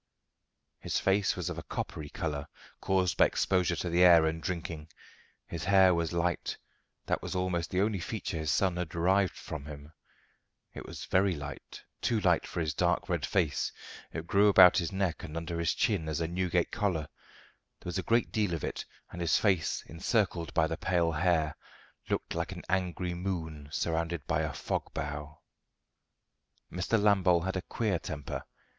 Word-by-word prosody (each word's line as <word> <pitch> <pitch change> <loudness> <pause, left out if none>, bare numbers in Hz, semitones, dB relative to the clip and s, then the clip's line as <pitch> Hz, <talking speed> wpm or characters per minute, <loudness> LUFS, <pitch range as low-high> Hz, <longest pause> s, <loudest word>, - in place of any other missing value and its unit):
His - - -1
face 95 0 +2
was - - -4
of - - -5
a - - -5
coppery 75 -2 -5
colour, 75 -4 -3 0.3
caused 95 -2 +1
by - - +6
exposure 90 -2 +1
to - - -3
the 85 +1 +3
air 85 -3 +8
and 80 +1 -1
drinking. 80 -1 -4 0.6
His 85 0 -5
hair 95 -1 +6
was 85 -1 0
light: 85 0 -1 0.5
that - - 0
was - - -5
almost 90 -3 -1
the 95 - +1
only 105 -1 +1
feature 90 -2 -4
his 80 -1 -2
son 95 0 +2
had 90 -2 -2
derived 95 +3 +2
from 75 -3 -7
him. 75 +1 -10 0.8
It - - -8
was - - -7
very 95 -1 +2
light, 75 -2 -8 0.2
too 115 -2 +1
light 90 -5 +2
for 85 - -3
his 80 -2 -1
dark 90 +5 +1
red 85 -4 0
face. 85 -7 0 0.4
It 80 - -5
grew 100 +4 +4
about 95 -2 +8
his 85 +1 -2
neck 95 -4 -1
and 80 -3 -6
under 85 0 -3
his 85 -2 +1
chin 100 -10 0
as 75 - -1
a 85 - 0
Newgate 90 0 0
collar; 95 -6 0 0.8
there - - -22
was 90 +1 -2
a - - 0
great 115 +4 +1
deal 105 -6 0
of 80 - -6
it, - - -3 0.3
and 90 - -6
his 85 -2 +3
face, 95 -6 +1
encircled 85 0 -1
by 80 - +4
the 80 +1 -3
pale 85 -3 +1
hair, 80 -1 +1 0.5
looked - - -2
like - - -2
an - - -7
angry 90 -1 -1
moon 80 -5 -4
surrounded 85 -1 -1
by - - +1
a - - -1
fog - - -3
bow. 75 +1 -5 1.3
Mr. 90 +5 0
Lambole 95 -4 +4
had 95 - -2
a 95 - -1
queer 105 -3 -1
temper. 75 -4 -5
85 Hz, 180 wpm, -30 LUFS, 80-95 Hz, 1.3 s, air